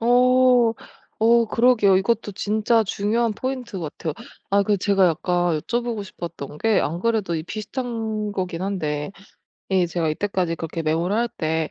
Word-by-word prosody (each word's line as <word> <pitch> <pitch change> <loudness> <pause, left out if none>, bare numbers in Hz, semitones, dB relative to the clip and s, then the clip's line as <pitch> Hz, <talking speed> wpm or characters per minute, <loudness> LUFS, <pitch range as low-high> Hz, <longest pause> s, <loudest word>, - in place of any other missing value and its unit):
어. 250 0 +4 0.5
어 230 +1 +5
그러게요. 220 -4 +4
이것도 205 +2 0
진짜 215 +3 +1
중요한 220 +3 0
포인트 250 -2 -4
같아요. 160 -1 -4 0.4
아 200 0 +4
그 205 +1 +2
제가 195 -1 +3
약간 175 0 +1
여쭤 240 +6 -2
보고 230 -3 -3
싶었던 170 -6 -8
게 225 +2 +2
안 165 +4 -2
그래도 215 -5 0
이 155 - -3
비슷한 220 0 -4
거긴 185 -3 -3
한데 155 -4 -2 0.6
이 185 -2 +3
제가 165 -1 -1
이때까지 180 -1 -1
그렇게 165 0 -4
메모를 165 +6 0
할 235 +1 +1
때 160 0 -1
200 Hz, 315 characters per minute, -23 LUFS, 170-230 Hz, 0.6 s, 어